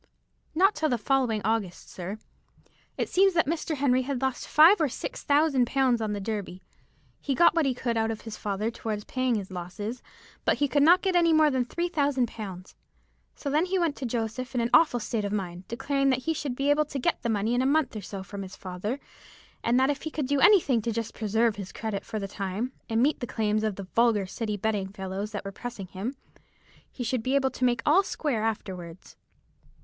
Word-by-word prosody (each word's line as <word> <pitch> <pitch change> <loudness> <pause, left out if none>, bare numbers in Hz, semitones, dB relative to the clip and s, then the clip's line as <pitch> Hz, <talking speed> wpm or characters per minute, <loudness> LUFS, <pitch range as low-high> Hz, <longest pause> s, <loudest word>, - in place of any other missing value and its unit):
"Not 385 +5 +5
till 310 0 0
the 245 - +1
following 230 -2 +1
August, 215 -5 -1
sir. 185 +3 -6 0.8
It - - -1
seems 385 0 +3
that 330 - +4
Mr. 315 +1 -2
Henry 260 -2 +2
had 265 0 -3
lost 265 -1 -2
five 330 +5 +7
or 300 - +2
six 375 - -6
thousand 285 -4 +3
pounds 255 -3 +2
on 215 -1 -1
the 205 - -3
Derby. 200 -3 -5 0.6
He 275 - -2
got 340 +3 +6
what 330 -4 +2
he 260 - 0
could 235 -2 -1
out 225 0 +1
of 220 -1 -4
his 225 -2 -7
father 210 +2 -2
towards 215 -2 -4
paying 255 0 0
his 200 -3 -4
losses, 195 +7 -5 0.4
but - - +2
he 290 - +2
could 285 +1 +2
not 350 +5 +6
get 365 -3 +3
more 310 -1 +5
than 255 -2 +1
three 340 +8 -2
thousand 285 -7 +1
pounds; 190 -5 -8 0.6
so 285 - -4
then 305 +4 +3
he 380 +1 0
went 335 -5 +1
to 260 - -3
Joseph 235 +2 -3
in 245 - +2
an 235 +1 -1
awful 245 -2 +5
state 225 -1 -2
of 200 - -2
mind, 185 -3 -4
declaring 275 +3 0
that 260 -1 +1
he 325 - 0
should 280 -4 -3
be 275 +2 +1
able 305 +1 +3
to 285 - -6
get 255 - 0
the 235 - -2
money 215 +1 0
in 245 - +2
a 260 - +2
month 295 -3 +1
or 215 - -4
so 195 0 -7
from 200 +1 -7
his 190 -1 -8
father, 190 +8 -4 0.6
and 240 +2 +3
that 265 +2 +3
if 280 - -5
he 315 - -4
could 300 -2 -3
do 280 +1 +1
anything 290 - +5
just 230 0 -3
to - - -17
preserve 220 +1 +1
his 195 -2 -6
credit 220 -3 -4
for 220 - -5
the 200 -2 -3
time, 200 +5 -3 0.2
and 225 +1 +2
meet 295 +2 +2
the 245 - -4
claims 215 -1 0
of 215 -3 0
the 195 - -6
vulgar 220 +1 +2
City 210 +2 -3
betting 205 -1 -1
fellows 195 +2 -5
who 205 - -2
were 195 - -4
pressing 235 -1 -7
him, 195 +9 -5 0.8
he 250 - -5
should 245 0 -1
be 255 +4 0
able 265 -1 +2
to 255 - -1
make 240 -2 +1
all 325 +6 +6
square 290 - -2
afterwards. 185 -6 -5
240 Hz, 225 wpm, -27 LUFS, 210-280 Hz, 0.8 s, five